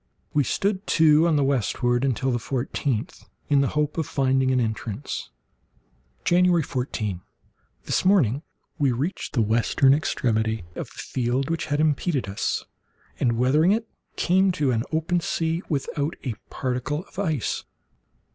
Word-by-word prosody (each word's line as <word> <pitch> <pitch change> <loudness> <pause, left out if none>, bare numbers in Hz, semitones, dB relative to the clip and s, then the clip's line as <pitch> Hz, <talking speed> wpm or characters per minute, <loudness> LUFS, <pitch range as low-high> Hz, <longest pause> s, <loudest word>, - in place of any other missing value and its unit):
We 145 - +3
stood 195 - -1
to 160 +1 +5
the 145 - +3
westward 120 -1 +1
until 130 0 +1
the 120 - 0
fourteenth, 125 -1 -3 0.2
in 140 -1 +4
the 140 - +2
hope 150 +2 0
of 160 - -1
finding 135 -1 +2
an 130 -1 +2
entrance. 110 +2 -3 1.0
January 175 -1 +4
14.—This 110 -9 -5
morning 155 - +3 0.4
we 140 -3 +3
reached 140 +11 -3
the 115 - +3
western 120 +5 +3
extremity 110 - 0
of - - -5
the - - -18
field 130 +4 -1
which 165 -1 -2
had 145 -1 0
impeded 155 - +1
us, 100 +1 -2 0.5
and, 120 -3 +1
weathering 150 - +4
it, 225 +1 -1 0.3
came 190 +2 +3
to 145 -7 +1
an 115 -2 +1
open 160 +2 +1
sea, 165 0 -1
without 145 +1 -2
a 125 - -2 0.2
particle 130 +6 -2
of 195 - -11
ice. 160 - -1
140 Hz, 140 wpm, -25 LUFS, 125-160 Hz, 1.0 s, to